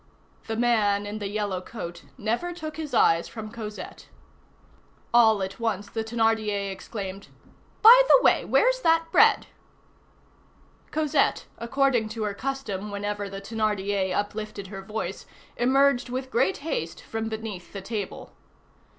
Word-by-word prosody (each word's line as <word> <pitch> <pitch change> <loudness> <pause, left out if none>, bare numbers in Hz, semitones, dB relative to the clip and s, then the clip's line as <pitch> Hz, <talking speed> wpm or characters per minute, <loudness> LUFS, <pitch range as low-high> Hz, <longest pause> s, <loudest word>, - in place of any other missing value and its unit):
The 225 - -2
man 215 -4 +2
in 210 +1 -5
the 205 - -3
yellow 205 -3 -2
coat 170 -5 -8
never 240 +10 -2
took 315 -3 -7
his 310 -3 -5
eyes 165 -8 +3
from 215 -2 -8
Cosette. 215 -2 -8 1.1
All 220 -4 +5
at 190 +3 -6
once, 210 -3 -2
the 225 - -2
Thénardier 220 -3 0
exclaimed:— 195 0 -7 0.6
"By 480 +3 +10
the - - +7
way, - - +4
where's - - +2
that 330 -3 +3
bread?" - - +5 1.4
Cosette, 305 -2 +1
according 245 -2 +1
to 220 0 -4
her 210 -1 -1
custom 215 -4 -4
whenever 205 0 -3
the 195 0 -7
Thénardier 205 -3 -1
uplifted 205 -1 -4
her 195 -1 -7
voice, 195 -2 -5 0.3
emerged 270 +1 +3
with 260 +1 -4
great 375 +10 +2
haste 165 - -3
from 225 0 -4
beneath 220 -5 -6
the 195 - -6
table. 210 -1 -5
215 Hz, 135 wpm, -26 LUFS, 200-240 Hz, 1.4 s, By